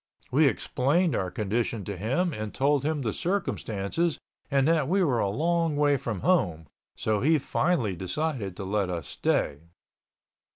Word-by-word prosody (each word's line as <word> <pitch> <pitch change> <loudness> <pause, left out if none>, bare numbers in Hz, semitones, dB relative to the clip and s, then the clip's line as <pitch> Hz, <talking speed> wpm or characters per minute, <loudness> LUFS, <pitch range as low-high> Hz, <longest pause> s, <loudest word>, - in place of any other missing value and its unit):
We 145 +3 +5
explained 145 +6 +1
our 95 - -1
condition 110 +1 -2
to 100 - -4
him 135 - 0
and 110 -3 -5
told 140 0 +2
him 150 -1 -1
the 110 -3 -1
circumstances 165 - -1 0.3
and 135 -1 +2
that 160 -4 +2
we 190 +4 +2
were 130 -8 +2
a 100 - +1
long 165 +6 +1
way 145 -1 +3
from 115 -7 -4
home, 90 - +1 0.3
so 110 -1 0
he 155 +6 +4
finally 135 - 0
decided 100 - -1
to 100 - -5
let 100 0 0
us 85 -4 -3
stay. 70 - 0
135 Hz, 160 wpm, -27 LUFS, 100-160 Hz, 0.3 s, We